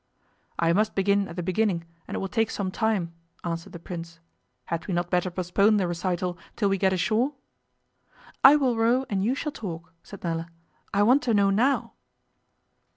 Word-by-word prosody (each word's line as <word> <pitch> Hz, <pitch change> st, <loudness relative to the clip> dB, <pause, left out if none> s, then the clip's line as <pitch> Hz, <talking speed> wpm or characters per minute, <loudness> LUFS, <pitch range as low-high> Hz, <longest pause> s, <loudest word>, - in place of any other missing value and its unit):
'I 170 Hz, 0 st, +2 dB
must 215 Hz, +4 st, +1 dB
begin 200 Hz, 0 st, +2 dB
at 170 Hz, -, -9 dB
the 180 Hz, -, -3 dB
beginning 185 Hz, -1 st, 0 dB, 0.2 s
and -, -, -5 dB
it -, -, -1 dB
will 195 Hz, -, -2 dB
take 225 Hz, +2 st, 0 dB
some 190 Hz, -2 st, -3 dB
time,' 200 Hz, -6 st, 0 dB, 0.3 s
answered 165 Hz, -1 st, -4 dB
the -, -, -8 dB
Prince. 170 Hz, -1 st, -8 dB, 0.5 s
'Had 170 Hz, -1 st, -4 dB
we 185 Hz, -, -1 dB
not 175 Hz, 0 st, -1 dB
better 180 Hz, 0 st, +1 dB
postpone 190 Hz, +4 st, +2 dB
the 190 Hz, -3 st, +1 dB
recital 175 Hz, 0 st, -2 dB, 0.2 s
till 205 Hz, -3 st, +1 dB
we 195 Hz, -1 st, 0 dB
get 190 Hz, 0 st, +3 dB
ashore?' 220 Hz, -, +1 dB, 1.1 s
'I 270 Hz, +2 st, +10 dB
will 265 Hz, -5 st, +2 dB
row 240 Hz, +4 st, +2 dB
and 195 Hz, -1 st, 0 dB
you 240 Hz, +6 st, +1 dB
shall 300 Hz, +1 st, -3 dB
talk,' 175 Hz, -, -7 dB
said 200 Hz, -, -12 dB
Nella. 165 Hz, -1 st, -2 dB, 0.4 s
'I 200 Hz, +1 st, +3 dB
want 255 Hz, +6 st, +5 dB
to 235 Hz, -3 st, +1 dB
know 200 Hz, -1 st, +4 dB
now. 250 Hz, +8 st, +1 dB
195 Hz, 185 wpm, -26 LUFS, 175-220 Hz, 1.1 s, I